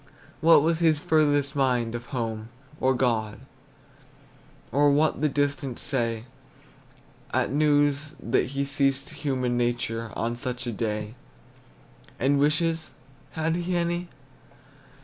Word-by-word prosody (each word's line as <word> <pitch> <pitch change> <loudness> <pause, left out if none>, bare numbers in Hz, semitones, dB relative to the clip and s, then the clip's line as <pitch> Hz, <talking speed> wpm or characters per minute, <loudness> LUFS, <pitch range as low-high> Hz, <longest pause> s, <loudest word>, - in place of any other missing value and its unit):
What 165 -2 +6
was 165 0 +1
his 160 -3 +4
furthest 145 -2 +2
mind, 125 -4 +1
of 120 +1 -6
home, 115 -4 -4 0.3
or 130 0 +2
God, 115 -4 0 1.3
Or 145 +2 +4
what 150 +2 +2
the 155 - +3
distant 140 -2 -1
say 115 -5 -1 1.1
At - - 0
news 145 +1 +2
that 115 - +1
he 140 +1 -2
ceased 140 -1 0
human 130 -4 -1
nature 115 -2 -1
On 115 +1 -1
such 125 0 -4
a 120 - -2
day? 105 0 -3 1.1
And 140 +2 +2
wishes, 160 +3 +1 0.4
had 160 +1 0
he 175 +1 -2
any? 175 +1 -1
140 Hz, 120 wpm, -26 LUFS, 120-150 Hz, 1.3 s, What